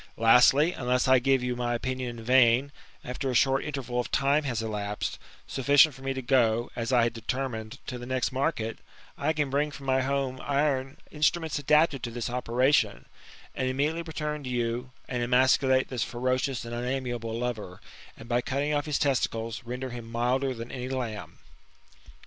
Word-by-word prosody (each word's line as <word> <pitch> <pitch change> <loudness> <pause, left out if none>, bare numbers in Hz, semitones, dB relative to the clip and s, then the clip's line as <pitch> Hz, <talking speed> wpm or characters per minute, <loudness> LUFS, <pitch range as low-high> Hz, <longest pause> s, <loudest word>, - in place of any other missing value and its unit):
Lastly, 125 +7 +6
unless 125 -3 0
I 130 0 +6
give 135 0 +2
you 125 0 -1
my 120 0 -1
opmion 130 0 -3
in 120 -1 -8
vain, 125 +2 +4 0.3
after 130 +2 -3
a 125 - -2
short 135 +2 +3
interval 130 -4 -3
of 120 - -2
time 140 +3 +2
has 120 -4 -2
elapsed, 105 -1 -3 0.3
sdfBcient 140 +3 +4
for 135 - -14
me 135 0 -2
to 130 - -4
go, 120 -2 +2
as 115 +1 -3
I 120 -2 +4
had 115 - 0
determined, 115 0 -4
to 125 -2 -5
the 120 - -8
next 130 0 0
market, 130 -5 -2 0.4
I - - 0
can 150 -3 -1
bring 145 +2 +1
from 140 -1 -10
my 130 0 +2
house 135 -1 -1
iron 140 -2 0
instruments 155 0 0
adapted 150 -1 +3
to 120 - -4
this 120 0 -4
operation, 125 +3 +1 0.5
and 130 - -2
immediately 150 +5 0
return 150 -2 -4
to 130 - -5
you, 120 0 -2 0.2
and 125 -1 -2
emasculate 130 +2 +3
this 125 -3 -3
IlS - - -6
THE 120 - -8
IIBTAMORPHOSI8, 130 +1 +1
OR 130 - +1 0.2
ferocioui 120 - -6
and 115 - -7
unamiable 120 -2 -3
lover, 110 -7 -4 0.4
and, 115 - -11
by 120 0 +1
cutting 140 +3 -1
off 145 0 -1
his 150 - 0
testicles, 115 -4 -1
render 125 +2 -5
him 120 -1 -8
milder 125 +3 0
than 115 +1 -7
any 130 -1 -5
lamb." 120 -5 -4
130 Hz, 190 wpm, -27 LUFS, 120-135 Hz, 0.5 s, Lastly